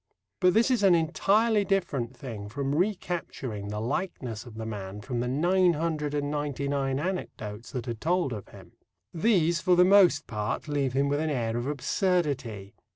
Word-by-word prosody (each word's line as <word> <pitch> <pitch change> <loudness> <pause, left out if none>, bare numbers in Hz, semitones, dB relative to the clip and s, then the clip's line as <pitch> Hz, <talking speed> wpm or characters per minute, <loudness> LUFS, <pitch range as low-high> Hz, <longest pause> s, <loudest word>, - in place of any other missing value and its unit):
But 180 +1 +4
this 230 +4 +4
is 245 -4 +2
an 190 -3 +6
entirely 200 +7 +2
different 145 - -1
thing 110 -7 -7
from 135 +5 -2
recapturing 165 - -2
the 105 +1 -4
likeness 125 - -3
of 115 - -11
the 110 0 -5
man 100 -2 -6
from 120 +2 -3
the 120 - -1
nine 175 +7 +3
hundred 150 -2 -2
and 145 0 -1
ninety 145 -2 -2
nine 135 -1 0
anecdotes 115 - -5
that 125 -2 -4
are 120 - -1
told 160 +3 0
of 105 -3 -7
him. - - -14 0.4
These 170 -2 +2
for 180 - +4
the 180 +1 +6
most 190 -6 +5
part 105 +6 -3
leave 140 -3 0
him 140 +1 +2
with 145 +1 0
an 160 0 0
air 115 -5 -1
of 120 +2 -2
absurdity. 140 - -1
145 Hz, 180 wpm, -28 LUFS, 120-175 Hz, 0.4 s, an